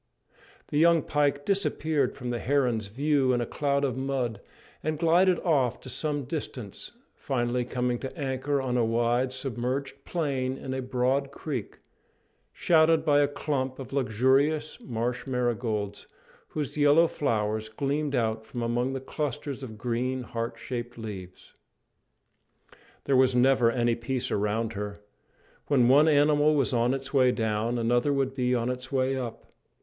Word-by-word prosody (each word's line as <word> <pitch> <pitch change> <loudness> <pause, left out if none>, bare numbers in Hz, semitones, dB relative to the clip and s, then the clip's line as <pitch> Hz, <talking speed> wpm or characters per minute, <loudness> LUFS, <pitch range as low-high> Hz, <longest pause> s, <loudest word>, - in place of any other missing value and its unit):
The 145 - 0
young 165 -1 +5
pike 145 -1 0
disappeared 160 -8 0
from 125 -1 -4
the 120 - -2
heron's 125 -6 +1
view 135 +3 +1
in 120 - +1
a 120 - -1
cloud 140 +2 0
of 130 -3 -1
mud, 130 -5 -2 0.4
and 155 0 -2
glided 175 +3 +4
off 135 -8 +1
to 130 - -9
some 150 -2 -2
distance, 125 - -6 0.2
finally 125 -2 -1
coming 125 -1 -1
to 135 +5 -7
anchor 135 0 -1
on 125 -2 -1
a 120 - +3
wide 120 +3 +1
submerged 130 +1 -3
plain 135 -6 -2
in 130 - -5
a 130 - -2
broad 130 +2 0
creek, 140 -5 -6 0.7
shadowed 160 -1 +3
by 145 -2 +4
a 145 - +4
clump 135 -2 -2
of 135 0 -8
luxuriant 135 +5 +1
marsh 120 +1 -3
marigolds, 115 -5 -2 0.4
whose 150 -1 -4
yellow 145 +3 +6
flowers 110 -7 -1
gleamed 140 +5 -1
out 110 -2 0
from 120 +2 -5
among 120 +3 0
the 135 - -2
clusters 145 0 -4
of 110 -5 -8
green, 125 +3 -2
heart 115 -1 -4
shaped 120 0 -6
leaves. 95 -5 -9 1.5
There 140 - +1
was 130 -1 +4
never 125 -1 +4
any 120 0 +1
peace 120 +2 -3
around 110 +2 0
her. 105 0 -5 0.7
When 130 -5 +4
one 145 +5 +6
animal 150 0 +4
was 135 -2 +1
on 120 +2 +2
its 135 +1 -6
way 130 -2 +5
down, 110 +1 -1
another 120 +4 +2
would 135 -1 0
be 125 -1 +1
on 120 +1 0
its 125 0 -6
way 135 0 +1
up. 125 -3 -5
130 Hz, 155 wpm, -27 LUFS, 120-145 Hz, 1.5 s, yellow